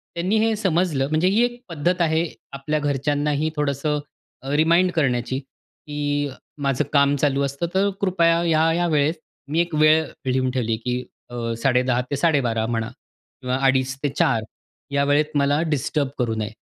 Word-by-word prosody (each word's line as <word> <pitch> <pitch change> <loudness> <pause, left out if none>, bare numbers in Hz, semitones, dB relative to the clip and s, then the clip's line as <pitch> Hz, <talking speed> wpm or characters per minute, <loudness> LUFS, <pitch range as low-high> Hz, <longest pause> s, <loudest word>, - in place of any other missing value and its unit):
त्यांनी 185 +6 0
हे 225 0 +2
समजलं, 175 -8 +1
म्हणजे 155 +4 +2
ही 210 +5 +3
एक 240 0 -5
पद्धत 175 +3 0
आहे 160 0 +2 0.3
आपल्या 150 +3 -2
घरच्यांनाही 145 +1 0
थोडंसं 150 +1 -1 0.4
अ, 135 - -7
रिमाइंड 170 +4 +4
करण्याची 130 -5 0
की 145 +1 -5 0.3
माझं 140 0 +1
काम 140 0 +4
चालू 140 -1 +1
असतं 140 +4 -2
तर 195 +2 +2
कृपया 170 -3 +3
ह्या-या 165 +1 +2
वेळेत 150 0 +2 0.4
मी 160 - +1
एक 175 -1 -3
वेळ 155 +1 +5 0.3
लिहून 130 0 +1
ठेवली 120 -3 -1
की 125 0 0 0.3
अ, 120 -1 -3
10:30 125 -1 +2
ते - - +1
12:30 135 -7 +1
म्हणा 115 -1 -2 0.5
किंवा 125 0 -1
2:30 130 0 +2
ते 145 - +2
4 115 -4 +1 0.5
या 140 0 +2
वेळेत 145 +2 +3
मला 145 +1 +2
डिस्टर्ब 145 -1 0
करू 115 -3 0
नये, 110 -1 -3
145 Hz, 160 wpm, -22 LUFS, 130-165 Hz, 0.5 s, वेळ